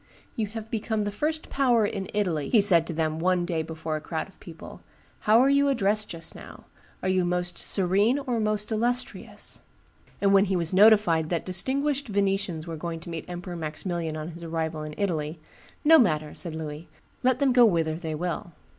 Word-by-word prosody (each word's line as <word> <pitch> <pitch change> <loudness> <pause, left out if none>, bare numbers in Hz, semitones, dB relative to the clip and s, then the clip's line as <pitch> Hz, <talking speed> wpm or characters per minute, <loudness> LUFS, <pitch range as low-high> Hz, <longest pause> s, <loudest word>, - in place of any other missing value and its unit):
"You 220 -2 -1
have 220 +1 -8
become 220 -1 -1
the 205 - -2
first 310 +9 -2
power 245 -5 +3
in 195 -2 -4
Italy," 180 -8 -1
he 230 - +5
said 175 -5 +5
to 170 - -4
then 160 0 -1
one 180 0 +1
day 170 -2 -1
before 160 0 -4
a - - -8
crowd 160 +1 -4
of 195 - -22
people: 165 -2 -11 0.4
"how 215 +2 +4
are 260 - +5
you 280 0 +4
addressed 215 -4 0
just 165 -1 -7
now? - - -12 0.4
Are - - 0
you 185 -1 +2
Most 175 0 -2
Serene 200 +6 +2
or 255 -5 -2
Most 215 0 0
Illustrious?" 240 +3 -2 0.6
And 200 -1 +3
when 195 0 +6
he 190 -1 -1
was 170 0 +2
notified 195 -6 +5
that 170 -2 -2
distinguished 275 +9 0
Venetians 195 -5 -1
were 165 -2 -6
going 165 +1 -5
to 170 - -8
meet 165 -1 -5
Emperor 175 0 -6
Maximilian 160 0 -4
on 155 +1 -5
his 170 0 -10
arrival 160 -1 -3
in 150 0 -7
Italy, 160 -5 -2 0.4
"No 320 +1 +7
matter," 155 -8 +1
said 170 -3 -5
Louis; 155 0 -7 0.3
"let 255 -1 +2
them 270 -1 +2
go 245 -1 +7
whither 165 -7 +3
they 160 -1 -4
will." 175 +1 -4
185 Hz, 195 wpm, -26 LUFS, 165-215 Hz, 0.6 s, No